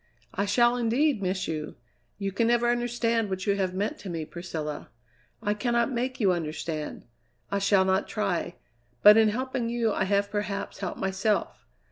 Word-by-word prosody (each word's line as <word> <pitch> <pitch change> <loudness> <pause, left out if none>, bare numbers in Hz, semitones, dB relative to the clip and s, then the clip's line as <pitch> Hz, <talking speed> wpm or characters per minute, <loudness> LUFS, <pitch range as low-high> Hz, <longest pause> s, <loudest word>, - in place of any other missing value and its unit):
"I 200 - 0
shall, 240 +4 +3
indeed, 245 +1 +2
miss 185 0 -1
you! 155 -1 -4 0.4
You 195 -1 -2
can 225 +4 +1
never 240 0 +3
understand 235 -2 0
what 190 0 -3
you 200 - +2
have 185 -2 -1
meant 205 +3 -2
to 195 - -7
me, 165 -2 -3
Priscilla. 160 -3 -6 0.5
I 205 -1 +1
cannot 235 +3 0
make 255 +1 -2
you 200 -5 +4
understand; 155 -2 -4 0.5
I 200 - +1
shall 200 -1 +4
not 190 +1 +1
try; 180 -4 -2 0.5
but 210 0 +10
in 220 -1 +5
helping 250 +1 -2
you 235 -2 0
I 190 - 0
have 200 +1 +1
perhaps 205 -1 -3
helped 190 -3 -4
myself. 195 +3 -1
205 Hz, 170 wpm, -27 LUFS, 190-235 Hz, 0.5 s, but